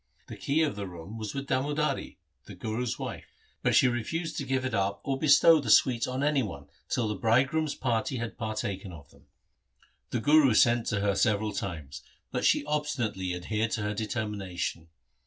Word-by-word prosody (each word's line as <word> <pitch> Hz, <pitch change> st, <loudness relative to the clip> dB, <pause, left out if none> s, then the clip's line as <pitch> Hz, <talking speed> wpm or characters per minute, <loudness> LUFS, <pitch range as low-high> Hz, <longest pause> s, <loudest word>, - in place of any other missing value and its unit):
The -, -, -6 dB
key 155 Hz, +4 st, +1 dB
of 150 Hz, -, -1 dB
the 100 Hz, -1 st, -5 dB
room 90 Hz, +5 st, -9 dB
was 110 Hz, +1 st, -5 dB
with 135 Hz, 0 st, -3 dB
Damodari, 145 Hz, +3 st, -1 dB, 0.3 s
the -, -, -10 dB
Guru's 115 Hz, +2 st, -3 dB
wife, -, -, -7 dB, 0.3 s
but -, -, +2 dB
she 130 Hz, -, +6 dB
refused 160 Hz, +8 st, -2 dB
to 140 Hz, -, -3 dB
give 130 Hz, -1 st, -1 dB
it 130 Hz, -, -2 dB
up 100 Hz, 0 st, 0 dB
or 135 Hz, -1 st, -2 dB
bestow 155 Hz, +2 st, +6 dB
the 135 Hz, -6 st, -4 dB
sweets 120 Hz, +2 st, +4 dB
on 130 Hz, +2 st, -2 dB
any 145 Hz, -1 st, +2 dB
one 85 Hz, -, -6 dB, 0.2 s
till 120 Hz, -3 st, 0 dB
the 105 Hz, -, -1 dB
bridegroom's 130 Hz, -, +1 dB
party 125 Hz, +1 st, -1 dB
had 115 Hz, -1 st, -4 dB
partaken 100 Hz, -5 st, -4 dB
of 70 Hz, -4 st, -13 dB
them. -, -, -22 dB, 0.8 s
The -, -, -1 dB
Guru 145 Hz, -2 st, +5 dB
sent 120 Hz, 0 st, +4 dB
to 100 Hz, -2 st, 0 dB
her 100 Hz, -1 st, +2 dB
several 105 Hz, 0 st, +1 dB
times, 80 Hz, -8 st, -5 dB, 0.3 s
but -, -, -1 dB
she -, -, +3 dB
obstinately 120 Hz, -12 st, -2 dB
adhered 105 Hz, +5 st, -1 dB
to 110 Hz, -, -1 dB
her 105 Hz, 0 st, -1 dB
determination. 100 Hz, -6 st, -3 dB
115 Hz, 185 wpm, -28 LUFS, 100-135 Hz, 0.8 s, she